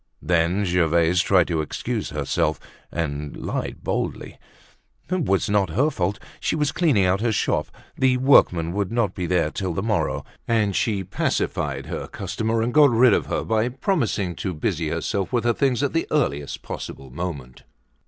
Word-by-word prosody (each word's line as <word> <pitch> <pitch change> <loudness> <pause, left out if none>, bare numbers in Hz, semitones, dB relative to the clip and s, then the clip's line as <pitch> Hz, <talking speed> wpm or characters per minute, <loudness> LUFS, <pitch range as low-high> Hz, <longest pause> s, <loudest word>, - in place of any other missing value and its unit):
Then 90 +3 +2
Gervaise 85 -1 +3
tried 90 -1 +3
to 80 -2 0
excuse 75 - -3
herself - - -1 0.3
and 75 -3 -3
lied - - -4
boldly; - - -3 0.7
it 180 -4 0
was 95 -1 +1
not 100 -3 +2
her 135 - +2
fault, 95 -4 -1 0.2
she - - -1
was 150 -2 +1
cleaning 140 - +3
out 95 +2 +2
her 115 0 +1
shop, 105 - 0 0.3
the 130 -1 +3
workmen 90 - +4
would 100 -1 -1
not 115 -5 +1
be 90 -2 -3
there 85 -3 +1
till 95 -4 -3
the 95 - -2
morrow; 75 -11 -1 0.2
and 105 -4 +1
she 100 -4 0
pacified 70 -5 -2
her - - -5
customer 110 0 -2
and 120 +1 -1
got 150 -2 +7
rid 120 -1 +5
of - - +1
her - - -1
by 110 +2 +1
promising 125 - -1
to 95 -4 -3
busy 80 0 -1
herself 90 +4 -2
with 120 -2 +1
her 120 0 +3
things 135 0 +1
at 140 - 0
the 165 - 0
earliest 75 - -1
possible 65 -2 -7
moment. 70 -5 -6
95 Hz, 175 wpm, -23 LUFS, 85-120 Hz, 0.7 s, got